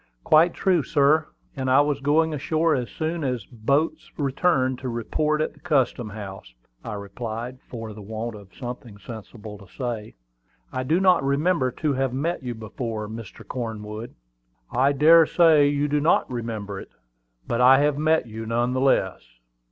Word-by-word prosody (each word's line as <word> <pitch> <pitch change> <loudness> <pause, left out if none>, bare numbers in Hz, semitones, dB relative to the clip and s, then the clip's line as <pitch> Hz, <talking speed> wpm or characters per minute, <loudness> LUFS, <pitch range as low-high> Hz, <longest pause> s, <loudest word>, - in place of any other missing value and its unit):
"Quite 165 +3 +5
true, 180 -4 +2
sir; 145 +3 +3 0.3
and 130 -2 -2
I 130 +2 +6
was 145 -1 0
going 155 +3 +2
ashore 155 +3 +1
as 125 -3 -1
soon 160 0 -3
as 125 -5 -1
the 125 - -18
boats 140 +8 0
returned 135 -2 +1
to 130 - -4
report 150 +7 -1
at 155 - -1
the - - -21
custom 130 -6 0
house," 100 - -9 0.3
I 110 - -5
replied, 115 +5 -6
for 115 -3 -7
the 105 - -10
want 110 +3 -5
of 100 -2 -13
something 120 -4 -7
sensible 105 0 -10
to 100 - -14
say. 115 -2 -5 0.6
"I 130 - -1
do 155 +7 +1
not 185 -6 +4
remember 140 0 +1
to 150 -2 -1
have 135 -1 -1
met 165 +5 -1
you 125 -2 -5
before, 110 0 -5
Mr. 110 -1 -9
Cornwood." 110 -2 -6 0.6
"I 130 +3 +3
dare 160 +3 +6
say 160 -4 +5
you 145 0 +1
do 150 0 +1
not 160 - +3
remember 110 -5 -4
it; - - -11 0.6
but 120 - 0
I 130 +2 +8
have 145 -1 +1
met 155 -1 +2
you 110 -1 -7
none 120 +2 0
the 130 - 0
less." 115 -8 +2
130 Hz, 175 wpm, -24 LUFS, 110-150 Hz, 0.6 s, I